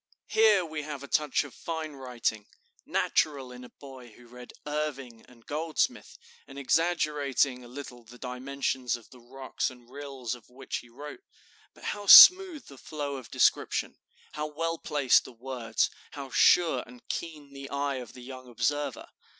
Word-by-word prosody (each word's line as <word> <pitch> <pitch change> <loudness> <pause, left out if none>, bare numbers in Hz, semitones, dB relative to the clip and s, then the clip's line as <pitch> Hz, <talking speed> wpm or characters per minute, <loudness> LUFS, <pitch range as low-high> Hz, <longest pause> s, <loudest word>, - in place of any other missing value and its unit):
Here 215 -4 +4
we 155 -1 -5
have 145 -2 -7
a - - -8
touch 150 -1 +1
of 145 - -12
fine 160 -2 -5
writing, 120 -5 -3 0.4
natural 140 -5 0
in 125 0 -11
a 125 - -12
boy 130 -3 -13
who 125 - -17
had 120 - -19
read 125 0 -12
Irving 140 -6 -4
and 115 -2 -20
Goldsmith, 155 +2 -2 0.3
and 135 - -12
exaggerating 140 -4 +1
a - - -12
little 125 -1 -10
the 120 +2 -15
dimensions 130 -1 -3
of 120 -2 -14
the 125 - -15
rocks 130 +2 -4
and 125 -1 -16
rills 135 -4 -6
of 120 -3 -12
which 130 +2 -6
he 120 - -12
wrote. 145 - -10 0.5
But - - -18
how 205 -1 -4
smooth 365 - +10
the 135 -2 -14
flow 145 -2 -5
of 130 - -11
description, - - +1 0.3
how 150 0 -4
well 165 +2 -3
placed 145 -5 +3
the - - -11
words, 120 -2 -2 0.2
how 140 -2 -8
sure 160 -6 +4
and 125 0 -16
keen 150 -4 -6
the 140 0 -9
eye 140 -1 -2
of 125 -3 -9
the 125 - -12
young 130 0 -10
observer! 135 +3 -2
135 Hz, 170 wpm, -28 LUFS, 125-150 Hz, 0.5 s, smooth